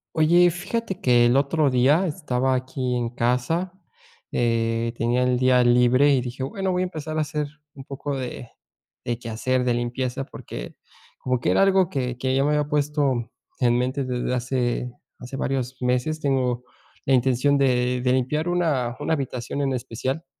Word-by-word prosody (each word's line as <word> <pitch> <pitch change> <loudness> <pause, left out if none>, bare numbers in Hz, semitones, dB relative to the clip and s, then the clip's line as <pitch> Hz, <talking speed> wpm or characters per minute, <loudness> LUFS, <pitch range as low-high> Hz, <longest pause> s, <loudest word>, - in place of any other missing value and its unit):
Oye, 170 +3 +5
fíjate 190 +2 -4
que 120 -1 +4
el 120 +2 +3
otro 145 +1 +2
día 140 +9 +3
estaba 135 -6 -1
aquí 130 -1 -2
en 120 -1 -2
casa, 125 +10 0 0.6
eh, 115 -1 0
tenía 120 +2 +1
el 125 -1 +1
día 130 -1 +4
libre 125 +4 +4
y 135 - +3
dije: 125 +1 -5
"Bueno, 190 +6 -2
voy 180 - 0
a - - +2
empezar 155 -3 -5
a - - +2
hacer 150 -1 -2 0.3
un 135 - -10
poco 140 0 -4
de 125 -2 -6 0.6
de 120 -1 -1
quehacer, 120 +2 -1
de 125 -1 +1
limpieza", 125 +2 -2
porque - - -9 0.4
como 125 -1 -1
que - - 0
era - - +3
algo 190 -2 +3
que 125 -6 -3
que 130 +1 -1
ya 135 - +3
me 145 - +1
había 150 -1 +1
puesto 145 -5 0 0.3
en 120 -1 +3
mente 130 +3 -1
desde 125 -1 -2
hace 125 0 -1 0.3
hace 130 +2 -7
varios 130 -1 -3
meses, 125 +5 0
tengo 125 -4 0 0.4
la 135 - +2
intención 130 +2 +3
de 125 -2 +1
de 125 0 +1
limpiar 140 +6 0
una 145 -9 0
una - - -1
habitación 135 -2 -3
en 135 -1 0
especial 130 +4 -3
130 Hz, 175 wpm, -24 LUFS, 125-145 Hz, 0.6 s, Oye